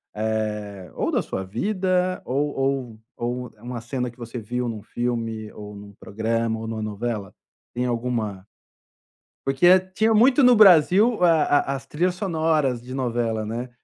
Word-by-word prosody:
eh, 105 Hz, -3 st, -3 dB
ou -, -, -1 dB
da -, -, +1 dB
sua 95 Hz, -, -4 dB
vida, 185 Hz, -, 0 dB
ou 145 Hz, +3 st, -1 dB
ou 135 Hz, -4 st, -2 dB, 0.2 s
ou 125 Hz, +1 st, -3 dB
uma 120 Hz, +2 st, -6 dB
cena 125 Hz, +1 st, -3 dB
que 120 Hz, -, -17 dB
você 120 Hz, 0 st, -7 dB
viu 125 Hz, +3 st, -3 dB
em 115 Hz, -, -2 dB
um 105 Hz, -, -8 dB
filme, 115 Hz, -1 st, -3 dB
ou 105 Hz, 0 st, -9 dB
em 100 Hz, -, -10 dB
um 100 Hz, 0 st, -13 dB
programa, 110 Hz, +2 st, -2 dB
ou 110 Hz, -, -6 dB
em -, -, -4 dB
uma 110 Hz, -1 st, -4 dB
novela, 110 Hz, -1 st, -4 dB, 0.4 s
tem 125 Hz, +1 st, -1 dB
alguma? 115 Hz, -5 st, -2 dB, 1.0 s
Porque 175 Hz, +7 st, +6 dB, 0.2 s
tinha 220 Hz, +3 st, +2 dB
muito 250 Hz, +6 st, +5 dB
no 250 Hz, -2 st, +7 dB
Brasil 200 Hz, +3 st, +6 dB
a 165 Hz, -3 st, +5 dB, 0.3 s
a -, -, -2 dB
as 135 Hz, 0 st, -8 dB
trilhas 175 Hz, +6 st, -1 dB
sonoras 160 Hz, -, 0 dB
de 125 Hz, +1 st, -9 dB
novela, 120 Hz, -4 st, -1 dB
né, 120 Hz, +4 st, -4 dB
120 Hz, 170 wpm, -23 LUFS, 110-155 Hz, 1.0 s, no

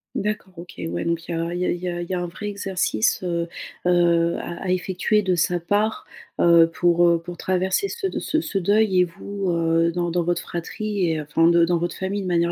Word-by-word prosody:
D'accord. 210 Hz, -2 st, -3 dB
OK, 175 Hz, +1 st, -10 dB, 0.2 s
ouais 85 Hz, +1 st, -3 dB
donc 170 Hz, 0 st, -1 dB
il -, -, -2 dB
y -, -, -1 dB
a 165 Hz, +1 st, -2 dB
il 175 Hz, -, -3 dB
y -, -, +1 dB
a -, -, +1 dB
il 175 Hz, -, -3 dB
y 180 Hz, -, -3 dB
a 175 Hz, 0 st, -3 dB
il 175 Hz, -, -7 dB
y -, -, -2 dB
a 180 Hz, -, 0 dB
un 175 Hz, -, -3 dB
vrai 195 Hz, +4 st, -7 dB
exercice, 190 Hz, -, 0 dB
heu, 170 Hz, -1 st, -1 dB, 0.4 s
heu 170 Hz, -1 st, +3 dB
à 170 Hz, +1 st, -6 dB
à -, -, -2 dB
effectuer 185 Hz, +4 st, +1 dB
de 185 Hz, -3 st, +1 dB
sa 175 Hz, +1 st, +1 dB
part. 205 Hz, +5 st, 0 dB, 0.4 s
Heu, 170 Hz, -1 st, +6 dB
pour, 175 Hz, 0 st, +3 dB
heu, 170 Hz, -1 st, +3 dB
pour 175 Hz, 0 st, -8 dB
traverser 190 Hz, -, 0 dB
ce 420 Hz, -1 st, -3 dB
de -, -, -5 dB
ce 315 Hz, -, 0 dB
ce 200 Hz, -, -3 dB
deuil 200 Hz, 0 st, +3 dB
et -, -, +6 dB
vous, 195 Hz, +2 st, -4 dB
heu, 165 Hz, 0 st, +2 dB
dans 175 Hz, -1 st, -1 dB
dans 175 Hz, 0 st, +1 dB
votre 175 Hz, +1 st, 0 dB
fratrie 200 Hz, +3 st, -3 dB
et 155 Hz, -, -1 dB
enfin 150 Hz, +3 st, +2 dB
de 170 Hz, 0 st, +5 dB
dans 175 Hz, 0 st, +1 dB
votre 170 Hz, +1 st, -3 dB
famille 195 Hz, +1 st, -3 dB
de -, -, -4 dB
manière 170 Hz, -1 st, +1 dB
175 Hz, 250 wpm, -23 LUFS, 170-190 Hz, 0.4 s, Heu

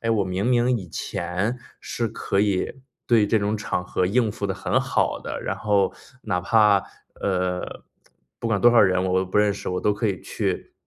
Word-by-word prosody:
哎， 115 Hz, -, -1 dB
我 105 Hz, -3 st, +2 dB
明 95 Hz, +2 st, -2 dB
明 125 Hz, 0 st, +3 dB
以 95 Hz, -6 st, -7 dB
前 95 Hz, +8 st, -3 dB, 0.2 s
是 115 Hz, -, -3 dB
可 105 Hz, -2 st, -2 dB
以 100 Hz, -2 st, +1 dB, 0.4 s
对 115 Hz, -3 st, +4 dB
这 110 Hz, -, +2 dB
种 105 Hz, +1 st, -1 dB
场 105 Hz, -3 st, -2 dB
合 90 Hz, -, -1 dB
应 110 Hz, +4 st, +2 dB
付 100 Hz, 0 st, -4 dB
得 95 Hz, -, -1 dB
很 -, -, 0 dB
好 -, -, 0 dB
的， -, -, -5 dB
然 -, -, -3 dB
后， 100 Hz, -3 st, +2 dB, 0.3 s
哪 100 Hz, -5 st, 0 dB
怕 100 Hz, +1 st, +4 dB, 0.3 s
呃， 90 Hz, -2 st, -2 dB, 0.6 s
不 -, -, -4 dB
管 105 Hz, -3 st, +1 dB
多 120 Hz, -, +7 dB
少 120 Hz, -, +5 dB
人 95 Hz, -2 st, +4 dB
我 95 Hz, 0 st, +2 dB
都 95 Hz, -, -1 dB
不 95 Hz, +3 st, 0 dB
认 105 Hz, -1 st, +3 dB
识， -, -, -5 dB
我 90 Hz, -, -2 dB
都 105 Hz, -, +1 dB
可 110 Hz, +2 st, -1 dB
以 95 Hz, -5 st, -2 dB
去 -, -, -3 dB
100 Hz, 220 characters per minute, -24 LUFS, 95-110 Hz, 0.6 s, 多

